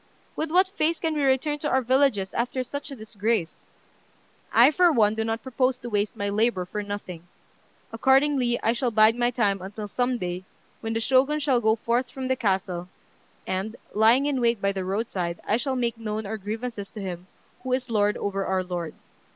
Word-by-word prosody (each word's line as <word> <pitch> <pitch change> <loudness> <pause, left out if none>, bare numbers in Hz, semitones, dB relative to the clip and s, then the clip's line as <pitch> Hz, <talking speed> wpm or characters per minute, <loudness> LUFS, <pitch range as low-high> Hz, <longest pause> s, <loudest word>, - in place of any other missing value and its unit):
With 315 - -2
what 365 +4 +5
f 385 +2 -12
ace 320 +2 +2
can 320 -1 -1
we 300 - -1
return 275 +2 +1
to 295 - -2
our 260 0 +2
villages 255 -6 +2
after 250 +2 -1
such 285 +3 -6
a 275 - -7
disgrace? 215 -4 -2 0.8
I, 245 +5 +7
for 350 +2 +4
one, 215 -7 +3
do 220 0 -1
not 225 +1 -2
propose 255 0 0
to 240 -1 -8
waste 205 0 0
my 200 - -2
labour 205 -2 +1
for 210 +3 -4
nothing; 195 -4 -7 0.7
accordingly, 265 0 +3
I 225 - +3
shall 245 +1 0
bide 220 0 +5
my 240 0 +2
time 205 -6 0
until 205 +3 -6
some 245 +4 0
day, 180 -2 -4 0.4
when 225 0 -3
the 225 - -1
Shogun 270 +5 +3
shall 270 -5 +2
go 220 0 +3
forth 235 +3 -1
from 260 -1 -5
the 260 - +3
castle, 190 -5 -1 0.6
and, 195 +4 -3 0.2
lying 230 +6 +5
in 280 -3 0
wait 235 -2 +2
by 200 0 +1
the 190 -1 -3
roadside, 185 -3 -2
I 215 - +3
shall 260 +2 -2
make 235 -2 -1
known 215 -1 -3
our 220 +2 -4
grievances 215 0 -5
to 215 - -10
him, 180 -2 -6 0.3
who 260 - -5
is 255 -1 -2
lord 210 -1 +2
over 195 -1 -2
our 190 -1 0
lord. 175 -3 -5
225 Hz, 200 wpm, -25 LUFS, 200-260 Hz, 0.8 s, I